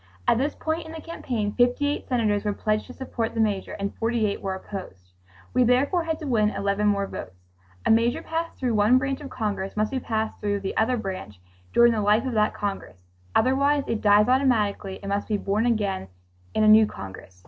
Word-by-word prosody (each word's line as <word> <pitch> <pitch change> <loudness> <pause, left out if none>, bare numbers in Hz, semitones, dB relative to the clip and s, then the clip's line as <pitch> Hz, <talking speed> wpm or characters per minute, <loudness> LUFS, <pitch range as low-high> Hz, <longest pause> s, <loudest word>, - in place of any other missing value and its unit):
At 230 - +4
this 285 +3 -1
point 320 +1 -3
in 320 - -9
the 325 - -6
campaign, 240 -10 -3
58 255 +4 +1
senators 215 -5 +1
were 210 -1 0
pledged 215 +1 -1
to 255 - -10
support 240 -4 -4
the - - -2
measure 205 -3 0
and 200 0 -4
48 225 -3 0
were 190 -1 -2
opposed. 180 - -9 0.4
We 255 0 +4
therefore 280 +8 +2
had 320 -1 -1
to - - -5
win 215 -5 +3
11 200 0 0
more 200 -1 +2
votes. 90 - -9 0.4
A - - +4
measure 230 +2 +2
passed 330 +1 -3
through 250 -3 -1
one 215 +4 +5
branch 270 +2 -2
of 280 - -7
Congress 210 -5 -3
must 215 +3 +1
be 265 - -1
passed 220 -3 -2
through 205 -1 -1
the 195 - -4
other 245 +3 +2
branch 190 - -6 0.3
during 235 0 +6
the 220 -2 0
life 210 +4 +3
of 260 - -2
that 215 -1 +2
Congress, 200 - -4 0.4
otherwise 280 +2 +3
it 225 - -2
dies 210 0 +5
automatically 225 -7 +1
and 200 - -5
must 200 0 -1
be 215 - 0
born 205 +4 0
again 205 - 0 0.5
in 215 - +3
a - - +5
new 215 0 +7
Congress. 95 - -10
220 Hz, 205 wpm, -25 LUFS, 205-255 Hz, 0.5 s, new